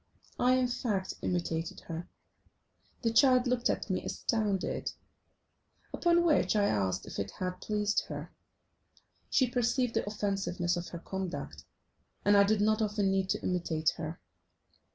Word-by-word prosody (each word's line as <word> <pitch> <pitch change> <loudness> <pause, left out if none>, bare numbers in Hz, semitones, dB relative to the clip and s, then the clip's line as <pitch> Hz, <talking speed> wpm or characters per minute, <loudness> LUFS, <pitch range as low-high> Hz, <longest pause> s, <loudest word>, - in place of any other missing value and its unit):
I, 250 +1 +4
in 255 -1 +2
fact, 210 -6 -2
imitated 170 -2 -2
her. 165 +1 -6 0.9
The 230 -1 +1
child 255 0 +5
looked 245 -1 +1
at - - -1
me - - -1
astounded, 210 -5 -1 1.0
upon 345 0 +3
which 310 -8 +3
I 205 - +3
asked 95 - 0
if - - -6
it 100 0 -2
had 180 0 -3
pleased 210 -1 0
her. - - -6 1.0
She 260 - +3
perceived 245 0 +1
the - - 0
offensiveness 195 -4 -1
of 175 0 -4
her 170 - -7
conduct, 190 +1 -5 0.6
and 205 - +6
I 200 - +7
did 205 +1 +2
not 215 +1 +3
often 205 -2 +1
need 190 -1 0
to - - -1
imitate 165 -3 +1
her. 160 +2 -5
205 Hz, 145 wpm, -31 LUFS, 175-235 Hz, 1.0 s, I